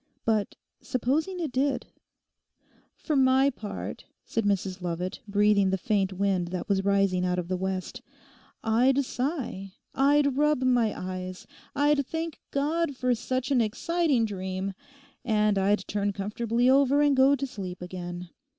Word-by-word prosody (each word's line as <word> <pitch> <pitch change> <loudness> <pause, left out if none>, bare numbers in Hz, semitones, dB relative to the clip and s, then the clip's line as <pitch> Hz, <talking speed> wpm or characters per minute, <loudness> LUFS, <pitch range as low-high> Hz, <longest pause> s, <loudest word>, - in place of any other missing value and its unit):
But 215 -3 0 0.3
supposing 300 +9 -1
it 320 -6 -2
did?' 265 +1 0 1.1
'For 310 - -2
my 265 +1 +4
part,' 220 -5 -7 0.2
said 225 - -1
Mrs 195 -2 -1
Lovat, 175 +1 -3
breathing 205 -1 +3
the 190 - +1
faint 195 0 0
wind 190 -2 0
that 180 0 -4
was 195 -1 +1
rising 195 -2 +2
out 180 0 0
of 175 -1 -2
the 185 - 0
west, 185 0 -4 0.6
'I'd 255 +5 +3
sigh; 245 - -3 0.2
I'd 280 0 +3
rub 300 -2 +2
my 245 -4 +3
eyes; 185 0 -6 0.3
I'd 290 0 +3
thank 325 -1 -4
God 295 +1 0
for 250 -1 +1
such 255 +3 -2
an 255 -3 +4
exciting 280 +3 +1
dream; 190 -1 -4 0.5
and 210 -4 +2
I'd 200 +2 +1
turn 205 0 -1
comfortably 230 +5 0
over 280 +2 +4
and 290 -1 +4
go 265 +2 +5
to 275 0 -3
sleep 190 -8 -7
again. 180 -1 -7
220 Hz, 145 wpm, -27 LUFS, 190-275 Hz, 1.1 s, go